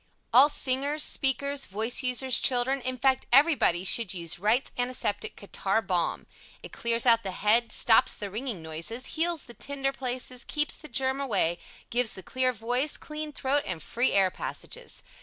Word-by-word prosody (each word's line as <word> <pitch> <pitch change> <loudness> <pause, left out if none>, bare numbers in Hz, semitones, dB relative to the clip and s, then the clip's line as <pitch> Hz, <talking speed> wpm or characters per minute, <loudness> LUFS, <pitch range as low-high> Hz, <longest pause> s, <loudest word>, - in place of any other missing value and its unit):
All 265 +5 +7
Singers, 280 +2 +1
Speakers, 280 +1 +1
Voice 220 +7 0
users, 255 0 +3
Children, 260 +2 0
in 255 +1 -3
fact 265 +1 +1
everybody 270 - +4
should 190 0 +2
use 170 -1 -2
WRIGHT'S 220 +7 0
ANTISEPTIC 245 -4 -2
CATARRH 200 +1 -2
BALM. 180 -3 -2 0.4
It - - -10
clears 235 0 +1
out 230 -2 +6
the 195 - -5
head, 220 +5 +1
stops 225 - +5
the 205 -2 -7
ringing 220 -5 -4
noises, 165 +11 -4
heals 330 -1 -1
the 240 - -13
tender 275 +3 -3
places, 255 -1 -4
keeps 300 -1 -1
the 305 - -11
germ 265 +2 0
away, 185 -10 0 0.3
gives 240 -1 +2
the 190 - -10
clear 255 0 0
voice, 245 +5 -1
clean 305 0 -7
throat, 280 0 -1
and 170 -4 -5
free 240 +2 0
air 190 -2 +3
passages. - - -6
245 Hz, 165 wpm, -27 LUFS, 210-270 Hz, 0.4 s, All